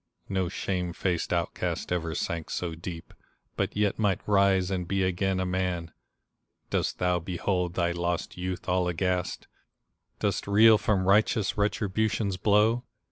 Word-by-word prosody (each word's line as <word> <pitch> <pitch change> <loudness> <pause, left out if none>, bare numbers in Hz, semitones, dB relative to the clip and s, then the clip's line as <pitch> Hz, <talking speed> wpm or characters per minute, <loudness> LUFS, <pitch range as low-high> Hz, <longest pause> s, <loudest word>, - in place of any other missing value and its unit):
No 95 -2 0
shame 90 -1 -2
faced 90 -2 -1
outcast 85 0 -2
ever 85 -3 -1
sank 85 +1 -3
so 85 -2 -3
deep, 85 0 -8 0.4
But - - -2
yet 105 0 +1
might 100 -4 0
rise 100 -2 +3
and 90 -2 -2
be 95 0 +1
again 95 +1 0
a 95 - 0
man! 90 -2 -2 0.8
Dost - - 0
thou 90 -1 +1
behold 90 0 -2
thy 85 -1 +1
lost 85 0 -2
youth 90 0 -4
all 90 0 +2
aghast? 90 +1 -1 0.7
Dost - - -1
reel 110 +2 +6
from 95 -3 +1
righteous 105 0 +3
Retribution's 105 -1 0
blow? 105 +5 +3
95 Hz, 140 wpm, -28 LUFS, 90-100 Hz, 0.8 s, reel